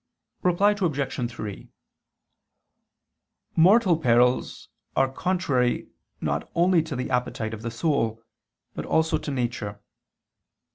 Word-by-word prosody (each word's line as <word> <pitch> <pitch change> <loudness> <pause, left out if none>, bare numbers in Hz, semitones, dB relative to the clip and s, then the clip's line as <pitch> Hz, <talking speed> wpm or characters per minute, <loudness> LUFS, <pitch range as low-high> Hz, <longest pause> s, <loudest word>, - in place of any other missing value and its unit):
Reply 180 +3 +3
Obj. 145 - -1
3: 105 -4 -7 1.9
Mortal 185 +1 +5
perils 125 -2 +2 0.3
are 135 - +4
contrary 140 -9 0 0.3
not - - -2
only 175 0 +4
to 155 -3 -5
the 125 +1 -3
appetite 120 -3 -1
of 110 - -7
the 115 - -3
soul, 115 -3 0 0.5
but - - -5
also 160 0 +2
to - - -6
nature. 120 -6 -3
135 Hz, 105 wpm, -25 LUFS, 120-170 Hz, 1.9 s, Mortal